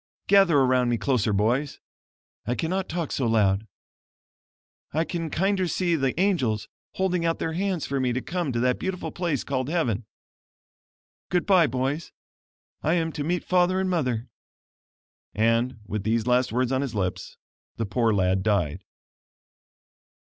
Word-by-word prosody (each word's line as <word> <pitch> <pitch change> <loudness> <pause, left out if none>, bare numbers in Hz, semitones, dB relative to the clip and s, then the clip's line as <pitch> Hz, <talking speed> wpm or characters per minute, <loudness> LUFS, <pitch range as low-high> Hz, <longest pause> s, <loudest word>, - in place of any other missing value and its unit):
Gather 195 -6 +5
around 130 -2 +3
me 120 - +1
closer 120 -4 +1
boys. 120 +8 0 0.7
I 125 - 0
cannot 185 +5 -2
talk 170 -3 -3
so 130 - 0
loud. 105 -2 +2 1.3
I 160 +2 +2
can 165 -1 -4
kinder 190 +2 +1
see 175 0 +1
the 135 0 -1
angels 135 - +1 0.3
holding 180 -2 0
out 165 0 +1
their 160 - -2
hands 185 -2 -1
for 140 0 -2
me 130 -1 +1
to 125 - -1
come 170 +1 -3
to 120 - -1
that 125 0 +1
beautiful 185 -1 -3
place 170 -7 -1
called 130 -1 -2
heaven. 125 - -1 1.2
Goodbye, 180 -2 +4
boys. 135 +5 -2 0.7
I 160 +3 +2
am 165 -2 0
to 150 -2 -4
meet 175 +3 -1
father 180 +1 +2
and 190 -1 0
mother." 125 -8 -1 1.1
And, 115 +2 +1
with 105 +1 -3
these 110 +2 0
last 125 0 +2
words 125 +2 0
on 130 0 +1
his 135 -5 -4
lips, 95 -3 -3 0.4
the 115 - -1
poor 115 +2 +1
lad 95 -2 +2
died. 95 -4 0
135 Hz, 150 wpm, -25 LUFS, 115-175 Hz, 1.3 s, Gather